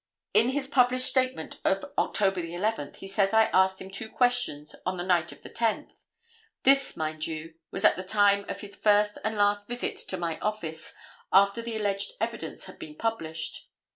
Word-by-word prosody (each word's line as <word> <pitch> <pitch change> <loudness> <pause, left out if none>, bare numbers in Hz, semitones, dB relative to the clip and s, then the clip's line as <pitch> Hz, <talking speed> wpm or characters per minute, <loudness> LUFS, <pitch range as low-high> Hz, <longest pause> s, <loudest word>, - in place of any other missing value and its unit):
"In 235 - +5
his 265 0 -2
published 255 -1 +3
statement 260 0 0
of - - +1
October 195 -3 +1
11th, 175 -1 -2
he 195 - -9
says 195 +1 +1
I 220 0 +5
asked 190 0 +4
him 190 - -9
two 210 +3 -6
questions 245 - 0
on 185 0 -2
the 175 - -2
night 175 -2 +2
of - - -14
the - - -9
10th. 230 -2 -2 0.6
This, 275 +1 +4
mind 155 0 -2
you, 160 0 -6 0.2
was - - -2
at - - +5
the 185 - -4
time 200 0 +3
of - - -4
his 200 -1 -9
first 210 0 +3
and 220 0 -2
last 205 0 +2
visit 245 +1 -3
to 190 - -4
my 170 -2 -3
office 165 -7 -4 0.4
after 200 +4 +5
the 230 -1 -5
alleged 200 - 0
evidence - - -4
had - - -12
been 315 -3 -9
published. 165 - -3
205 Hz, 185 wpm, -28 LUFS, 180-230 Hz, 0.6 s, In